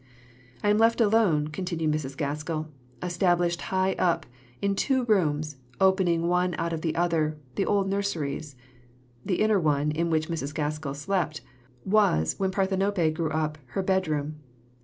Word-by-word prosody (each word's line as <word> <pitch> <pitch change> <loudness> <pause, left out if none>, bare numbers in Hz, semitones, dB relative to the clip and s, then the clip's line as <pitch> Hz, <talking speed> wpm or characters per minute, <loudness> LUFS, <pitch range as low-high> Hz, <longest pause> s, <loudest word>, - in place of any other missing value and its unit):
"I 205 - +4
am 210 - +3
left 230 +1 +4
alone," 205 -9 +3
continued 165 -2 -2
Mrs. 135 -3 -3
Gaskell, 155 +1 -3 0.3
"established 175 -1 +1
high 190 0 +1
up, 175 -2 +2 0.3
in 200 0 +1
two 260 +5 +1
rooms, 155 - +1 0.2
opening 185 -3 +3
one 180 0 +1
out 170 0 -1
of 160 - -3
the 160 -1 -1
other 165 -3 +1 0.2
the 195 - -1
old 200 -1 +2
nurseries." 160 -8 -2 0.7
(The 185 - -1
inner 215 -2 +3
one, 150 -2 +1
in 165 +2 -1
which 155 -1 +1
Mrs. 155 -3 -4
Gaskell 150 -2 -2
slept, 155 -1 -1 0.4
was, 190 - +3
when 190 -1 +1
Parthenope 190 -3 +1
grew 160 -1 -1
up, 155 0 -2
her 195 - 0
bedroom.) 155 -6 0
170 Hz, 150 wpm, -27 LUFS, 155-190 Hz, 0.7 s, I